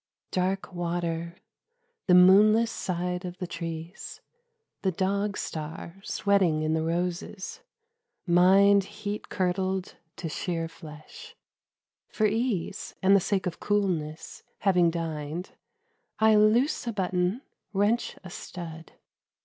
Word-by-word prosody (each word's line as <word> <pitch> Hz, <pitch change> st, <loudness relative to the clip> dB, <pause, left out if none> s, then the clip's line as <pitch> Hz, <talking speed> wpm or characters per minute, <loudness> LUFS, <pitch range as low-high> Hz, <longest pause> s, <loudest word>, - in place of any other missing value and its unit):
DARK 190 Hz, +1 st, -1 dB
water: 170 Hz, -1 st, -2 dB, 0.7 s
the 180 Hz, -, +6 dB
moonless 210 Hz, +5 st, +6 dB
side 180 Hz, 0 st, -3 dB
of 180 Hz, 0 st, -6 dB
the 180 Hz, -, -4 dB
trees; 170 Hz, +1 st, -6 dB, 0.6 s
The 190 Hz, -, +1 dB
Dog 200 Hz, +3 st, -1 dB
Star 160 Hz, +3 st, -6 dB
sweating 190 Hz, -9 st, +2 dB
in 155 Hz, 0 st, +1 dB
the 160 Hz, -, +1 dB
roses: 175 Hz, -, -3 dB, 0.6 s
mind 195 Hz, +3 st, +5 dB
Heat 210 Hz, 0 st, -6 dB
curdled 185 Hz, 0 st, -1 dB, 0.2 s
to 170 Hz, -, -5 dB
sheer 165 Hz, +1 st, -2 dB
flesh. 155 Hz, -2 st, -12 dB, 0.7 s
For 215 Hz, -, 0 dB
ease 215 Hz, -3 st, -1 dB
And 195 Hz, +1 st, +6 dB
the -, -, +6 dB
sake 190 Hz, +1 st, -1 dB
of 175 Hz, -2 st, -3 dB
coolness, 175 Hz, -7 st, -1 dB, 0.2 s
having 180 Hz, -3 st, +4 dB
dined, 165 Hz, 0 st, -4 dB, 0.7 s
I 220 Hz, 0 st, +5 dB
loose 225 Hz, +6 st, +3 dB
a -, -, 0 dB
button, 185 Hz, +4 st, 0 dB, 0.3 s
wrench 210 Hz, +4 st, +1 dB
a 185 Hz, -, -9 dB
stud. 165 Hz, -3 st, -8 dB
180 Hz, 115 wpm, -27 LUFS, 170-200 Hz, 0.7 s, the